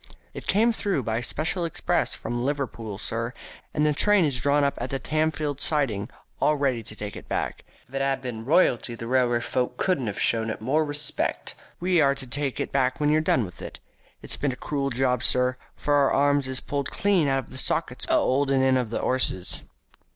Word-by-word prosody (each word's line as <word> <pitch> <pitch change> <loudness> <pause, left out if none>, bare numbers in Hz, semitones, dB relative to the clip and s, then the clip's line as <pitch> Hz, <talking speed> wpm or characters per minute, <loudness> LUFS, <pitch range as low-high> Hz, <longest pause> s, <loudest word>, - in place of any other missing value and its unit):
"It - - -8
came 225 +4 +3
through 200 - -1
by 110 +1 -1
special 160 +8 -1
express 165 - 0
from 120 0 -3
Liverpool, 125 -7 -3
sir, 115 +3 -2 0.4
and 150 0 +1
the 150 - +3
train 205 +3 +4
is 135 -5 0
drawn 145 +2 +3
up 140 - +2
at 120 - -3
the 135 - -1
Tamfield 155 -2 -1
siding 120 -9 +1 0.3
all 150 - +3
ready 135 -4 +1
to 105 -1 -10
take 105 -1 -6
it - - -10
back. - - -2 0.2
If 125 - -23
it 135 - -1
'ad 135 0 +1
been 115 -3 -5
royalty 125 -4 +2
the 115 - -7
railway 120 -1 +2
folk 125 +1 -1
couldn't 180 -11 0
ha' 100 - -10
shown 110 +2 +1
it - - -4
more 135 +8 +1
respec'. 150 -1 -1 0.3
We 180 -1 +3
are 140 -1 +4
to 140 -1 -6
take 135 +2 -2
it - - -2
back 130 -1 +1
when 150 0 +2
you're 155 +1 +4
done 130 -7 +2
with 90 - -11
it. - - -7 0.5
It's - - -3
been 145 - 0
a - - -5
cruel 140 0 -2
job, 125 -1 +1
sir, 125 0 +2 0.2
for 145 - -1
our 140 -1 +4
arms 145 0 +3
is 130 -1 -1
pulled 140 -1 -3
clean 195 -7 +2
out 135 -1 +1
of - - -19
the 130 - -6
sockets - - -1
a - - +4
'olding 135 0 +2
in 130 0 +4
of 125 -3 -1
the 115 - -2
'osses." 130 -8 -1
135 Hz, 215 wpm, -26 LUFS, 120-150 Hz, 0.5 s, train